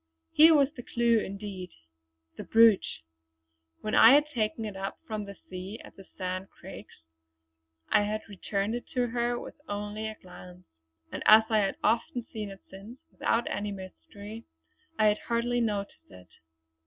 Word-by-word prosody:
Here 320 +1 +7
was 280 -2 +4
the 245 - -7
clue 235 -1 +2
indeed. 195 -2 -6 0.7
The - - -7
brooch! 225 - +4 0.8
When 215 - -4
I 230 +5 +8
had 295 - +5
taken 220 -2 -1
it 210 -2 -6
up 195 0 -5
from 215 -2 -4
the 200 0 -9
sea 185 +4 -7
at - - -14
the 195 - -14
Sand 185 +1 -4
Craigs - - -13 0.9
I - - +4
had 215 +1 -2
returned 200 +1 -3
it 240 - -5
to 245 -1 +1
her 240 0 -1
with - - -11
only 210 +1 -4
a 220 - -6
glance; 180 -1 -14 0.5
and - - -5
as 220 +1 +9
I 215 - +4
had 195 -2 0
often 235 +3 0
seen 215 -2 -4
it 195 0 -11
since, 205 +6 -11
without 230 +1 0
any 205 +1 -3
mystery, 205 +3 -10 0.5
I 215 - +3
had 210 0 +3
hardly 240 +1 0
noticed 205 -3 -3
it. 90 -2 -15
215 Hz, 165 wpm, -28 LUFS, 195-230 Hz, 0.9 s, as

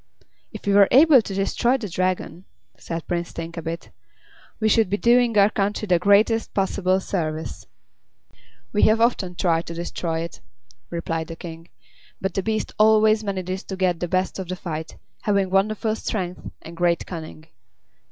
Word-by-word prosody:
"If - - -10
we 200 - +2
were 200 -1 +7
able 280 -1 +7
to 205 - -7
destroy 235 +6 +1
the 230 -5 -5
Dragon," 185 0 -2 0.3
said 165 -1 -6
Prince 175 -1 -3
Thinkabit, 165 0 -6 0.7
"we 220 - +1
should 220 -2 +3
be 205 - 0
doing 235 0 +3
our 200 +1 +5
country 205 +1 -1
the 180 -4 +3
greatest 210 +4 +3
possible 190 -1 +1
service." 160 -5 -4 1.1
"We 210 - +2
have 220 +1 +3
often 215 -6 +1
tried 170 -2 0
to 170 - -6
destroy 165 -1 -3
it," 170 -1 -7 0.5
replied 165 -1 -3
the 165 - -7
King, 165 0 -10 0.5
"but 190 - -2
the 195 - 0
beast 215 +2 -2
always 215 0 +5
manages 190 -1 -3
to 190 - -5
get 185 -3 0
the 175 - -2
best 185 +2 -1
of 190 - -5
the 185 - -3
fight, 160 -3 -6 0.2
having 200 -3 +1
wonderful 215 +3 +1
strength 180 -5 -4
and 170 - -10
great 170 0 +1
cunning. 160 -2 -8
190 Hz, 160 wpm, -23 LUFS, 170-215 Hz, 1.1 s, were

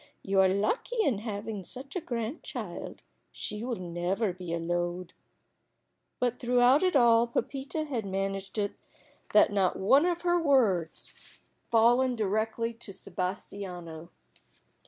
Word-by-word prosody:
You 195 0 +3
are 190 - +5
lucky 320 - 0
in 245 - +1
having 210 -2 -5
such 265 - -8
a 365 - -1
grandchild. 235 +1 -5 0.3
She 210 +1 -5
will 245 -1 -2
never 180 +3 -2
be 180 -1 -7
a 170 - 0
load." 175 +1 -2 1.1
But 245 -1 0
throughout 250 +3 +4
it 370 -3 +2
all 235 -2 +5
Pepita 275 +5 -2
had 245 -9 -3
managed 195 +1 -3
it 205 -1 0 0.6
that 210 - +6
not 190 -3 +2
one 275 - +4
of 345 -1 -1
her 350 0 +2
words 220 - +1
had - - -16 0.3
fallen 245 +3 +4
directly 220 +2 -1
to 230 -3 -11
Sebastiano. 180 -3 -6
215 Hz, 135 wpm, -29 LUFS, 190-250 Hz, 1.1 s, that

